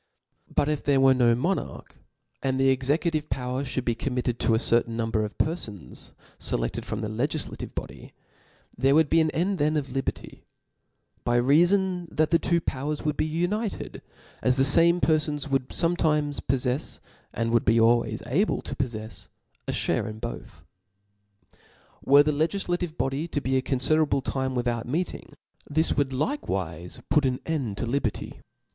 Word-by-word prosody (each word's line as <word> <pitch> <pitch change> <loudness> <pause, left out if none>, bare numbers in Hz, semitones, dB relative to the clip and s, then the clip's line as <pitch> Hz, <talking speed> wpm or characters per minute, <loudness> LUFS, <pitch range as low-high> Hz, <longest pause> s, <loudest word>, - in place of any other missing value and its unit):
But 145 - +3
if 150 -1 -1
there 140 -2 +3
were 135 0 +6
no 120 -2 +4
monarch, 175 +11 -3 0.5
and 130 0 0
the 135 0 +4
execu<^ 145 +6 +1
tive 155 -2 -2
power 130 +1 -2
(hould 130 -2 -3
be 120 - +2
committed 125 0 -2
to 115 - +2
a - - +3
certain 115 0 +1
num* 115 -1 -1
bcr 110 -1 +1
of 105 - -8
perfons 110 - -3 0.3
fclefted - - 0
from - - -4
the 110 - -2
legiflative 135 +8 -3
body, - - -7 0.6
there 135 +3 +3
would 160 -2 +3
be 165 - +5
an 160 - +2
end 185 +5 -1
then 155 +1 +2
of 140 -3 -3
liberty; 135 +1 -5 0.8
by 120 0 +2
reafon 175 +7 +3
the 155 -1 +2
two 170 +1 +1
powers 150 0 -3
would 150 -1 0
be 155 - 0
united, 185 +7 -2 0.4
as 125 +1 +2
the 135 - +4
fame 170 +5 +4
per 155 -1 +4
ibns 150 -2 -3
^ - - -11
would 135 -2 0
fometimes 150 -4 +1
poiTeis, 130 +2 -1 0.3
and 115 0 -1
would 115 -1 +3
be 115 +2 +3
al« 115 +1 +5
ways 110 -1 -5
able 160 - 0
to - - -6
poflefs, 110 -4 -5 0.4
a - - 0
fliare - - 0
in 110 - -7
both. 75 - -8 1.4
Were 140 +1 +7
the 150 - +1
legiflative 175 +2 -1
body 135 +5 -1
to 155 - -2
be 130 -1 -1
a 130 - +3
confiderable 140 +2 +2
time 130 -1 -2
without 120 -1 -1
meeting, 165 +8 -3 0.3
this 160 +3 +1
would 140 -2 +1
likewiie 95 - -3
put 150 - +4
aa 125 -1 0
end 135 -11 -2
to - - -2
liberty. 120 -2 -2
135 Hz, 170 wpm, -26 LUFS, 120-155 Hz, 1.4 s, Were